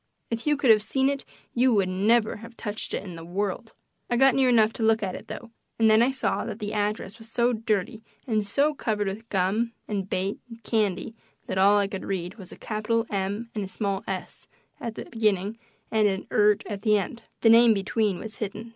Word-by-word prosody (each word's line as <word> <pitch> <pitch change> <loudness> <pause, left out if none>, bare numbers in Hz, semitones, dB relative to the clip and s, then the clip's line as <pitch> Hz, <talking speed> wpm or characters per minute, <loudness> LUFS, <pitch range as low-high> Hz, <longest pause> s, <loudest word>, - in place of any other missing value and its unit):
If 230 +4 -3
you 295 -1 +3
could 265 -4 +5
have 215 -1 +6
seen 265 +5 +1
it 280 -1 -3 0.3
you 250 -1 +3
would 195 -2 +3
never 215 +5 +2
have 230 +2 -12
touched 210 0 -4
it - - -4
in 180 -4 -8
the 165 - -9
world. 200 +5 -3 0.4
I 240 - +1
got 270 +1 +6
near 265 -1 +3
enough 220 -2 +4
to - - -7
look 220 0 +3
at 185 -2 -2
it, - - -8
though, 235 -2 -8 0.3
and 225 -1 +5
then 215 +1 +6
I 240 - +4
saw 265 -1 -1
that 220 -3 -5
the 210 -1 -4
address 210 0 -2
was 225 0 -13
so 240 +1 +2
dirty 215 -2 -1 0.2
and 215 -4 +1
so 280 +9 +1
covered 215 -7 -1
with 210 +4 -5
gum 205 +5 0
and 195 -2 -3
bait 190 +2 -1
and 230 -1 -12
candy 215 -1 0 0.3
that 190 - -2
all 200 +2 +6
I 200 -1 +2
could 195 -2 -6
read 190 +1 -4
was 185 -2 -10
a - - -11
capital 225 +1 -1
"M" 200 +4 -2
and 210 - -2
a - - -4
small 195 0 -2
"s" 190 -1 -6 0.3
at 230 -5 -5
the - - -6
beginning 215 -1 0 0.3
and 215 -1 +4
an 190 -1 -2
"ert" 210 -1 +4
at 205 -2 -5
the 210 -1 +4
end; 205 +4 -4 0.2
the 225 - +5
name 230 -1 +7
between 200 0 0
was 220 +3 -8
hidden. 215 +2 -5
215 Hz, 225 wpm, -26 LUFS, 200-230 Hz, 0.4 s, name